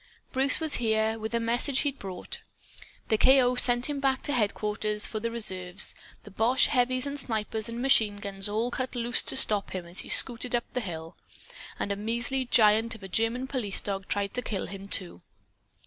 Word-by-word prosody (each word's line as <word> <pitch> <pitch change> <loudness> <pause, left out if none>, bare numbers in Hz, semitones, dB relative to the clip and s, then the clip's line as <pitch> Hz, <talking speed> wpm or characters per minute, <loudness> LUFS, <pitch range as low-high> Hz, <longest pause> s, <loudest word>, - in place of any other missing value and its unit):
Bruce 270 +2 +3
was 315 -2 +6
here, 220 -1 0
with 220 0 -5
a - - +1
message 240 +4 0
he'd 280 -2 -3
brought. 185 -2 -6 0.7
The 220 - +1
K.O. 260 -1 +4
sent 245 0 +5
him 290 -1 -4
back 270 -1 0
to 290 - -3
headquarters 210 -2 -1
for 215 - -4
the 230 +2 -3
reserves. 190 -5 -2 0.3
The 205 - -14
boche 230 +6 +2
heavies 255 -1 0
and 285 0 -5
snipers 220 -3 -3
and 230 +1 -6
machine 220 -6 +4
guns 200 -1 -4
all 225 +4 -2
cut 255 +1 -4
loose 240 0 +2
to - - +2
stop 210 -6 +5
him 180 -2 -5
as 170 +2 -2
he - - -4
scooted 245 0 +3
up 235 - -2
the 250 - -2
hill. 165 -5 -8 0.6
And 200 - -2
a - - -1
measly 235 +5 -2
giant 225 -1 +3
of 215 - -14
a - - -7
German 225 +6 -1
police 245 -7 -2
dog 195 -2 -5
tried 200 -1 -2
to 250 - -3
kill 205 -5 -4
him, 195 0 -9
too. 180 - -3
225 Hz, 195 wpm, -27 LUFS, 205-250 Hz, 0.7 s, was